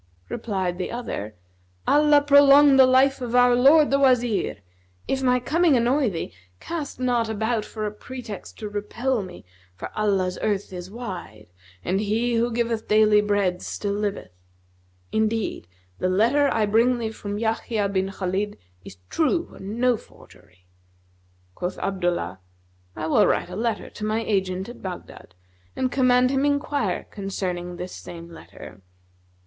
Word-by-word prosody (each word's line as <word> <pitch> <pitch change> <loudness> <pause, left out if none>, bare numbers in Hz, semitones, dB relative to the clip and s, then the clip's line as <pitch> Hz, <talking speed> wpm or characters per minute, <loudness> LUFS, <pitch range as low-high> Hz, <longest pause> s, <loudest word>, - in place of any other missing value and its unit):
Replied 190 -5 -3
the 185 - -3
other, 110 - -5 0.5
"Allah 295 0 +5
prolong 285 0 +7
the 260 -1 +7
life 265 +1 +3
of 245 -1 -3
our 245 0 +6
lord 285 +4 +5
the 275 - +3
Wazir! 245 -5 +2 0.5
If 265 - -1
my 250 -1 +3
coming 310 +3 +2
annoy 250 +2 +2
thee, 165 -4 -5 0.3
cast 300 - -5
not 240 -3 +1
about 220 +1 -1
for 215 -1 -5
a 210 - -2
pretext 225 -1 -9
to 215 - -5
repel 215 +4 -2
me, 185 - -10 0.3
for - - -7
Allah's 195 -4 0
earth 205 -2 -1
is 180 0 -7
wide 180 - -8 0.3
and 190 +2 0
He 225 +4 0
who 235 +1 +1
giveth 230 -1 -1
daily 215 -1 +5
bread 200 -3 0
still 205 -1 -3
liveth. 205 - -3 0.8
Indeed, 220 - -1 0.3
the 185 - 0
letter 240 +10 +3
I 220 -2 +2
bring 230 +4 +3
thee 225 -2 -3
from 205 -2 -6
Yahya 220 -1 -1
bin 190 -1 -1
Khalid 195 +2 -3 0.3
is 95 - -12
true 335 +2 0
and 205 +4 -7
no 250 -1 +3
forgery." 90 - -20 0.9
Quoth 180 - -4
Abdullah, 175 - -2 0.6
"I - - -4
will 190 +5 +4
write 180 - 0
a - - -6
letter 230 +2 -2
to - - -9
my 215 +1 -1
agent[FN#250] 190 -2 -1
at 240 - -11
Baghdad 180 - -9 0.4
and 255 -1 -1
command 255 -1 +3
him 270 0 +1
enquire 285 0 0
concerning 180 -3 -4
this 180 +1 -7
same 170 0 -10
letter. 160 -10 -12
220 Hz, 150 wpm, -24 LUFS, 190-250 Hz, 0.9 s, prolong